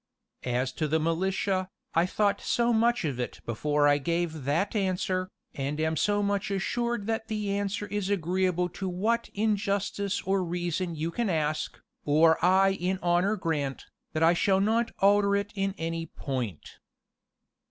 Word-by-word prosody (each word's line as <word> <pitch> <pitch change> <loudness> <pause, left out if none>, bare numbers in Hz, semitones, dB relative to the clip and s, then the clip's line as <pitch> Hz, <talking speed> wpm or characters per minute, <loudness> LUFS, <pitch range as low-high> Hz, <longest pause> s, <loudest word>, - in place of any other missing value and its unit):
"As 125 +2 0
to 155 +4 -2
the 160 +2 +1
militia, 185 +3 0 0.3
I 165 +2 +3
thought 200 +1 +1
so 240 0 +1
much 235 -2 +2
of 135 -5 -2
it 125 - -4
before 145 +6 +1
I 145 0 +4
gave 165 -1 -2
that 165 +10 0
answer, 185 -2 0 0.2
and 145 +1 -3
am 160 0 +1
so 205 +5 +1
much 200 0 0
assured 235 +3 -1
that 225 0 -2
the 210 -2 -2
answer 200 +1 -1
is 205 -1 -3
agreeable 180 -1 +1
to 190 +2 -4
what 220 +6 0
in 215 +1 +2
justice 200 0 -1
or 190 0 +1
reason 175 0 -2
you 160 +2 -2
can 230 +4 -1
ask, 155 -3 -1 0.2
or 160 +2 +4
I 190 +2 +5
in 190 0 -1
honor 175 +4 +2
grant, 150 -8 -2 0.3
that 155 0 +1
I 165 +1 +6
shall 190 +2 +2
not 225 +3 +2
alter 200 0 +4
it 200 +1 -2
in 195 -1 -1
any 165 0 -3
point. 125 - -5
185 Hz, 165 wpm, -28 LUFS, 160-200 Hz, 0.3 s, I